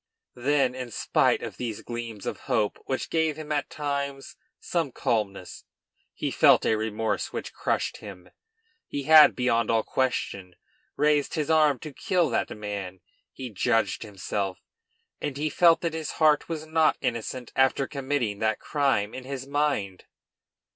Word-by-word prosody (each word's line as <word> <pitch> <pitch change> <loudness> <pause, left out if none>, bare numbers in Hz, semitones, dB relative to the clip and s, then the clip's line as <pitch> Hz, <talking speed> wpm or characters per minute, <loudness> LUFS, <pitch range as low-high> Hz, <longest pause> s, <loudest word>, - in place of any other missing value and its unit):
Then, 135 -1 +2
in 130 -1 -6
spite - - +1
of - - -6
these 115 -4 -4
gleams 115 -3 -6
of - - -4
hope, 105 -2 +1
which 130 -2 -3
gave 160 -2 +1
him 155 -1 -7
at 145 -2 -1
times 140 -2 -4 0.2
some 165 -6 -1
calmness, 100 -6 -2 0.5
he - - -2
felt - - +5
a 110 - +3
remorse 110 0 -2
which - - -5
crushed - - -1
him. 95 -4 -11 0.6
He 145 - -4
had, 155 +1 +8
beyond 115 -3 +1
all 115 -1 +2
question, 100 -8 -2 0.4
raised 150 -1 +2
his 155 -1 -1
arm 155 -3 +4
to 155 - -8
kill 180 +3 +1
that - - 0
man. 100 -3 -6 0.3
He 130 -2 -7
judged 105 0 +1
himself; 100 -2 -3 0.6
and 145 -2 -3
he 155 +1 -1
felt 170 0 +5
that 170 -2 -1
his 160 -1 -4
heart 155 -1 +3
was 160 -2 -4
not 160 0 +2
innocent 120 +1 -3
after 135 +1 +3
committing 135 -7 -2
that 110 -1 +1
crime 135 -8 0
in 130 - -7
his 135 -1 -5
mind. 140 -10 -1
130 Hz, 155 wpm, -26 LUFS, 110-150 Hz, 0.6 s, had